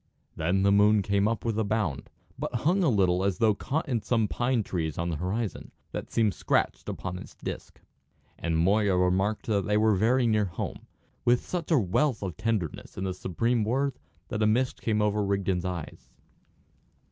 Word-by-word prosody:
Then 90 +5 +1
the 100 - +4
moon 105 +1 +5
came 100 +1 +2
up 115 +1 -2
with 110 -2 0
a - - +2
bound, 100 -10 -2 0.3
but - - -4
hung 185 +5 +3
a 165 - +4
little 95 -5 +2
as 100 -1 0
though 110 -2 +4
caught 145 +9 -2
in 120 -5 0
some 115 -2 +1
pine 120 +1 0
trees 80 -6 -3
on 85 +1 -1
the 85 - -1
horizon, 95 +6 -3 0.2
that - - -5
seemed 110 -4 +2
scratched - - 0
upon 90 -1 -5
its - - -11
disc. - - -7 0.6
And 85 -1 0
Moya 100 +3 +3
remarked 95 +4 +1
that 100 -5 0
they 105 0 +2
were 110 0 +4
very 120 +6 +3
near 110 -2 +2
home, 85 -3 -6 0.4
with 120 0 +3
such 175 -3 -4
a 160 - +4
wealth 115 +4 +1
of 95 -3 -4
tenderness 110 -7 -3
in 95 - -3
the 95 -1 -1
supreme 115 +6 0
word 135 +5 0 0.3
that 110 - -2
a 110 - +4
mist 125 +4 +1
came 105 -2 +1
over 105 0 +1
Rigden's 95 -2 0
eyes. 90 -4 -6
105 Hz, 190 wpm, -28 LUFS, 95-115 Hz, 0.6 s, moon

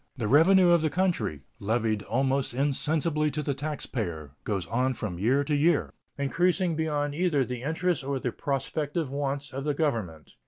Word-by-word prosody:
The 115 -4 -1
revenue 175 - +6
of 170 -2 +5
the 155 - +1
country, 145 - -1 0.2
levied 110 0 0
almost 130 +3 0
insensibly 150 +3 +1
to 150 +1 -3
the 140 - -1
taxpayer, 115 - -4
goes 100 -4 -1
on 130 +2 0
from 90 -7 -4
year 130 +8 +2
to 150 +1 -2
year, 150 +2 +2 0.2
increasing 175 +5 +1
beyond 150 -2 -1
either 155 -4 +1
the 125 0 -5
interests 160 +2 -1
or 140 0 -1
the 125 -2 -2
prospective 145 +3 -2
wants 140 0 -3
of 135 +1 -4
the 150 -1 0
Government. 110 - -2
140 Hz, 165 wpm, -27 LUFS, 120-155 Hz, 0.2 s, revenue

